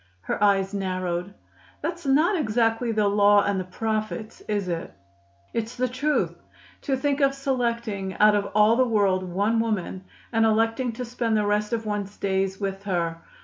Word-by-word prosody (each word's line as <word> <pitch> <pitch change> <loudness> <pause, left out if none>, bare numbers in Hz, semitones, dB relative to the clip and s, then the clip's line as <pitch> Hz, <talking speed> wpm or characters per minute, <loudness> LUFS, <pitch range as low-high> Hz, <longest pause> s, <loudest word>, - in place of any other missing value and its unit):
Her 155 - -2
eyes 195 -1 +3
narrowed. 185 -2 -2 0.5
"That's 335 -1 -4
not 310 +9 +4
exactly 230 -4 +1
the 215 -2 +2
Law 205 0 +5
and 200 -1 0
the - - -2
Prophets, 215 +3 -3
is 205 -3 -1
it?" 170 -2 -3 0.6
"It's 230 0 -3
the 255 0 0
truth. 275 +5 0 0.5
To 270 -2 -1
think 285 +2 0
of 275 0 +3
selecting 235 -8 -2
out 210 0 +5
of 205 -1 0
all 215 +2 +5
the 255 - +5
world 200 -5 +2
one 200 +5 0
woman, 195 -4 -2 0.3
and 225 0 +3
electing 225 +3 +2
to 250 +2 -5
spend 235 -2 -1
the 210 - +1
rest 210 +1 0
of 225 -1 -2
one's 205 -1 -3
days 190 -1 -1
with 195 -1 -3
her! 170 -4 -1
215 Hz, 170 wpm, -25 LUFS, 195-235 Hz, 0.6 s, Law